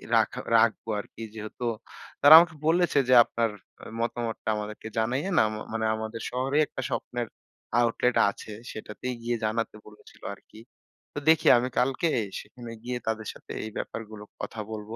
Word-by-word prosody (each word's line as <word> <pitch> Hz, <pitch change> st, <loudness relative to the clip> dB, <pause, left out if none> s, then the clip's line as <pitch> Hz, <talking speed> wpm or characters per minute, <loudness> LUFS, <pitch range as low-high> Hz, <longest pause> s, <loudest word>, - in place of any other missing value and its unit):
রাখা -, -, +2 dB, 0.2 s
রাখবো 115 Hz, 0 st, +2 dB
আরকি 115 Hz, -, -9 dB
যেহেতু 110 Hz, +3 st, -6 dB, 0.6 s
তারা 145 Hz, +2 st, +10 dB
আমাকে 170 Hz, -2 st, +1 dB
বলেছে 170 Hz, -3 st, +3 dB
যে, 130 Hz, -, +6 dB
আপনার 115 Hz, -1 st, -1 dB, 0.5 s
মতামতটা 115 Hz, -2 st, -3 dB
আমাদেরকে 105 Hz, +1 st, -6 dB
জানাইয়েন 130 Hz, +11 st, 0 dB
আ -, -, +3 dB, 0.3 s
মানে 110 Hz, 0 st, -1 dB
আমাদের 110 Hz, +1 st, -5 dB
শহরে 130 Hz, +3 st, -1 dB
একটা 130 Hz, -, -6 dB
স্বপ্নের 120 Hz, -1 st, -3 dB, 0.5 s
আউটলেট 120 Hz, +1 st, +1 dB
আছে, 100 Hz, -, -9 dB, 0.2 s
সেটাতেই 110 Hz, +4 st, -6 dB
গিয়ে 120 Hz, 0 st, 0 dB
জানাতে 115 Hz, +1 st, -1 dB
বলেছিল 105 Hz, 0 st, -17 dB
আরকি। 110 Hz, -, -17 dB, 0.5 s
তো -, -, -1 dB
দেখি 160 Hz, -1 st, +4 dB
আমি 125 Hz, +2 st, 0 dB
কালকে 135 Hz, +6 st, +1 dB, 0.3 s
সেখানে 120 Hz, -2 st, -11 dB
গিয়ে 125 Hz, 0 st, -3 dB
তাদের 110 Hz, -1 st, -2 dB
সাথে -, -, -13 dB
এই 110 Hz, -, -6 dB
ব্যাপারগুলোর 110 Hz, -2 st, -7 dB
কথা 115 Hz, -, -6 dB
বলবো। 110 Hz, +1 st, -6 dB
115 Hz, 150 wpm, -27 LUFS, 110-125 Hz, 0.6 s, তারা